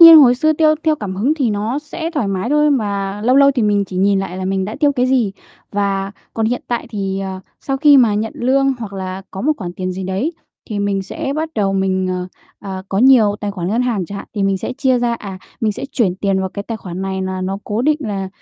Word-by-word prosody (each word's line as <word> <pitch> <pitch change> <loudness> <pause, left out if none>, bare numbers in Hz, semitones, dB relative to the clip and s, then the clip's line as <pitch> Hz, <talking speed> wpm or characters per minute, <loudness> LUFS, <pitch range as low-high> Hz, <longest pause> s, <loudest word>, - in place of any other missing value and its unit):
nhiên 330 -1 +12
hồi 250 -4 +7
xưa 310 +5 +2
tiêu 310 0 +4
theo 315 -1 +4
cảm 195 -5 -5
hứng 255 +10 +2
thì 270 -7 0
nó 215 +6 -1
sẽ 320 +2 -5
thoải 290 - -1
mái 195 +5 -2
thôi, 300 0 +4
mà 200 -6 -1
lâu 250 +4 +3
lâu 280 0 +7
thì 260 -4 0
mình 205 -1 +2
chỉ 185 -1 -8
nhìn 195 +1 +3
lại 190 -1 -4
là 190 - -3
mình 190 0 0
đã 215 - -5
tiêu 290 -2 +4
cái 250 -2 +1
gì. 250 -6 +2 0.4
Và 200 -1 -1 0.2
còn 225 -1 0
hiện 245 +2 -1
tại 240 -1 -2
thì, 195 -3 -2
ờ, 190 -1 -5 0.2
sau 270 - -2
khi 290 +1 +6
mà 235 -6 +5
nhận 215 +2 -2
lương, 270 +2 +2
hoặc 215 -4 -6
là 190 0 -5
có 190 - -6
một 305 +7 +2
khoản 175 -5 -5
tiền 185 0 -3
gì 190 +1 -5
đấy, 195 - -1 0.4
thì 205 - -2
mình 200 -1 0
sẽ 235 +7 -4
bắt 315 +1 -1
đầu 200 -3 +1
mình, 190 -1 0
ờ, 180 0 -2 0.3
ờ, 190 -2 -6
có 195 - -1
nhiều 230 -5 +5
tài 205 - -2
khoản 180 -3 -4
ngân 230 +5 +1
hàng 220 -8 -1
chẳng 200 - -6
hạn, - - -8
thì 205 - -1
mình 195 -1 +1
sẽ 220 - -4
chia 260 -3 +3
ra. 240 -1 +1
À, 195 -4 -7 0.2
mình 215 -2 +1
sẽ 260 - -5
chuyển 205 -9 +1
tiền 195 0 0
vào 190 - -1
cái 200 +2 -6
tài 225 +1 -5
khoản 185 -3 -6
này 190 0 -2
nà 185 0 -3
nó 190 +1 -2
cố 210 +3 -1
định 300 +2 +3
là 200 -7 -3
205 Hz, 265 wpm, -18 LUFS, 195-255 Hz, 0.4 s, nhiên